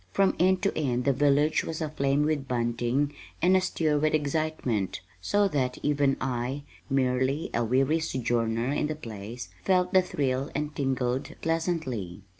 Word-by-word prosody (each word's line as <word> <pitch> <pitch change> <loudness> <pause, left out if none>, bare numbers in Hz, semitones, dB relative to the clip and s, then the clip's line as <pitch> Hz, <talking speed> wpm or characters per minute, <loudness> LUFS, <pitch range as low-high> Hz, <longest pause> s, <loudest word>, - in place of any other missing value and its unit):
From 195 -1 +3
end 185 +1 +3
to 200 - +1
end 125 -5 0
the 140 - +4
village 145 +3 +3
was 160 - -4
aflame 145 -2 +1
with 150 -3 0
bunting 120 +4 0 0.3
and 180 +3 +4
astir 160 -5 +1
with 155 +1 +2
excitement, 145 - -1 0.2
so 205 0 +2
that 130 -6 -1
even 145 -2 +2
I, 130 +2 -2 0.3
merely 130 +2 +1
a 120 - +1
weary 135 +7 +2
sojourner 120 -4 0
in 150 - 0
the 155 - -3
place, 115 -3 -8
felt 180 -1 +2
the 190 - +7
thrill 135 -6 -1
and 150 +1 -2
tingled 130 -1 -1
pleasantly. 155 - -2
140 Hz, 150 wpm, -27 LUFS, 125-155 Hz, 0.3 s, the